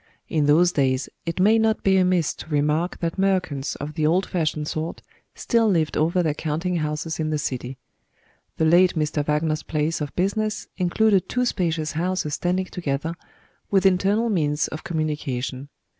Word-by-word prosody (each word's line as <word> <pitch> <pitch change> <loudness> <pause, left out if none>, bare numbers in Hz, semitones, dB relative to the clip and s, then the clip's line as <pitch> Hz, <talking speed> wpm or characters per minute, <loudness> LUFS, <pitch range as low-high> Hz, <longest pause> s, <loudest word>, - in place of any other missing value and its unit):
In 150 -3 +1
those 170 +4 +5
days, 130 -4 0 0.2
it 170 +2 -3
may 215 +4 +5
not 220 0 +1
be 190 -1 +4
amiss 180 -3 +2
to - - -10
remark 150 +3 0
that 170 +2 -2
merchants 180 -8 0
of 150 +2 -6
the 150 0 +1
old 180 +4 +2
fashioned 155 -4 -1
sort 160 +2 -4 0.3
still 230 -2 +2
lived 165 -5 +1
over 170 +3 +2
their 155 -3 +1
counting 165 +4 -2
houses 155 +1 -3
in 155 -1 -1
the 155 - 0
city. 130 -3 -4 0.8
The 160 - +2
late 175 +3 +5
Mr. 150 -1 0
Wagner's 155 +1 0
place 155 +1 -2
of 145 - -4
business 210 +3 -1
included 195 +1 +2
two 250 0 0
spacious 165 -8 -1
houses 170 -2 -1
standing 180 +3 0
together, 160 -3 -3 0.6
with 195 -1 +2
internal 195 +5 +3
means 150 -5 +1
of 155 - -7
communication. 145 -4 -3
160 Hz, 165 wpm, -23 LUFS, 150-185 Hz, 0.8 s, those